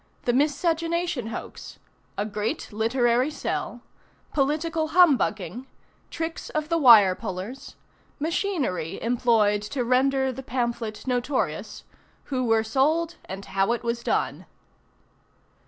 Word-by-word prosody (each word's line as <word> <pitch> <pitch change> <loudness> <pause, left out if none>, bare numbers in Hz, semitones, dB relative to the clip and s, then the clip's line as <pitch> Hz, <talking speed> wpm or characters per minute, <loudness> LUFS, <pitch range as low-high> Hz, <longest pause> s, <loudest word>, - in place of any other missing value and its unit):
THE 240 - +1
MISCEGENATION 325 0 0
HOAX. 225 - -8 0.4
A 205 - 0
GREAT 215 +7 -3
LITERARY 240 +4 +2
SELL. 305 - -4 0.5
POLITICAL 315 +3 0
HUMBUGGING. 260 - +2 0.4
TRICKS 325 0 -5
OF 305 0 -3
THE 335 0 +2
WIRE 220 -9 +8
PULLERS. 190 +8 -7 0.4
MACHINERY 305 - -1
EMPLOYED 225 -3 +2
TO 245 +5 -3
RENDER 265 +2 +2
THE 265 - -7
PAMPHLET 235 -4 -3
NOTORIOUS. 255 +1 -2 0.4
WHO 260 -2 -2
WERE 225 -1 +3
SOLD 310 +9 +1
AND 195 +1 -7
HOW 195 +4 +1
IT 240 - -4
WAS 235 0 -2
DONE. - - -1
250 Hz, 110 wpm, -25 LUFS, 225-300 Hz, 0.5 s, WIRE